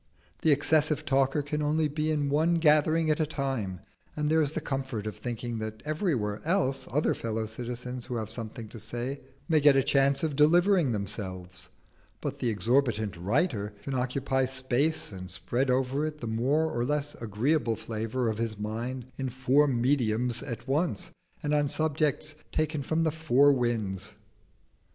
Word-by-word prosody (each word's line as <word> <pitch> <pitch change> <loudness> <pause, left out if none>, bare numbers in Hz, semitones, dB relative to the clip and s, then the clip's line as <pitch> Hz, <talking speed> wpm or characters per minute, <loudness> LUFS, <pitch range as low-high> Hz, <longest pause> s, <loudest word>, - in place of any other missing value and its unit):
The 160 - +4
excessive 150 +1 +2
talker 135 +1 +2
can 150 +1 -2
only 155 +1 +2
be 150 +1 -2
in 145 -2 0
one 160 +4 +3
gathering 155 0 +4
at 150 - 0
a 155 - +3
time, 130 - -3 0.3
and 150 0 0
there 160 0 +4
is 145 -1 0
the - - -1
comfort 135 -7 -3
of 105 - -4
thinking 120 -1 -4
that 110 0 -6
everywhere 150 - -1
else 165 -6 0
other 150 +3 +2
fellow 110 -1 -3
citizens 125 +2 -5
who 125 - -4
have 110 -2 -3
something 115 0 -6
to 115 - -9
say 120 +5 -4 0.3
may 160 -3 +4
get 145 -1 +6
a 135 - +4
chance 140 +1 +3
of 155 -3 0
delivering 170 +1 +4
themselves; 95 -4 -5 0.5
but - - -4
the 120 - 0
exorbitant 110 -1 +1
writer 105 - 0
can 140 - -4
occupy 130 +1 0
space 130 +4 0
and 95 -1 -7
spread 120 +8 0
over 130 +3 +1
it 155 -1 -6
the 120 - -6
more 125 +8 +1
or 120 - 0
less 145 +2 -1
agreeable 115 +3 +1
flavour 115 +3 -3
of 110 -1 -1
his 115 -2 -2
mind 115 +4 -4
in 135 -1 -2
four 130 +4 +3
"mediums" 120 -2 +1
at 125 -3 -6
once, 155 +6 0 0.3
and 150 0 0
on 145 -1 +3
subjects 155 0 0 0.2
taken 155 -1 0
from 160 +4 0
the 160 - +2
four 145 -3 +4
winds. 115 -7 -2
130 Hz, 170 wpm, -28 LUFS, 115-150 Hz, 0.5 s, get